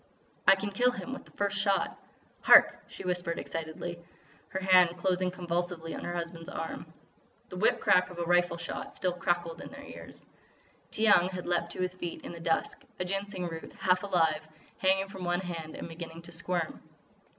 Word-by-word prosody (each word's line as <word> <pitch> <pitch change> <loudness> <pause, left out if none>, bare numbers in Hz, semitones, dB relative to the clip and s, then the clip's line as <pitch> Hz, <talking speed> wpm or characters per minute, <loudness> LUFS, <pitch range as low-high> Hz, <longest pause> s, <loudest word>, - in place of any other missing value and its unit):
"I 195 - +9
can 200 +1 -4
kill 245 +5 +3
him 250 +1 -5
with 270 - -8
the - - -19
first 205 0 0
shot." 195 -1 +1 0.5
"Hark!" - - +7
she - - -9
whispered 180 -2 -1
excitedly, 165 +1 -5 0.5
her 190 - -3
hand 180 -2 +5
closing 185 +1 +1
convulsively 175 -2 -3
on - - -6
her 175 - -3
husband's 170 -1 -5
arm. - - -5 0.6
The 180 - -7
whip 210 - +3
crack 180 0 +4
of 180 - -10
a 170 - -1
rifle 175 0 +3
shot 170 - -6
still 180 -2 0
crackled 175 -1 -1
in - - -8
their 280 +1 -10
ears. - - -11 0.6
Tiyang 205 -5 +4
had 185 -1 -5
leaped 175 -1 0
to - - -5
his 185 0 0
feet 175 -2 -6
in - - -6
the 170 - -8
dusk, 165 -1 -1 0.2
a 180 - -1
Ginseng 195 -1 -2
root, 165 -1 -7
half 180 -1 +2
alive, 165 -6 +2 0.4
hanging 195 +1 +3
from 190 -1 -8
one 175 +1 +1
hand 165 -4 -5
and - - -6
beginning 165 0 -8
to 170 - -11
squirm. 170 0 -3
180 Hz, 185 wpm, -30 LUFS, 170-190 Hz, 0.6 s, I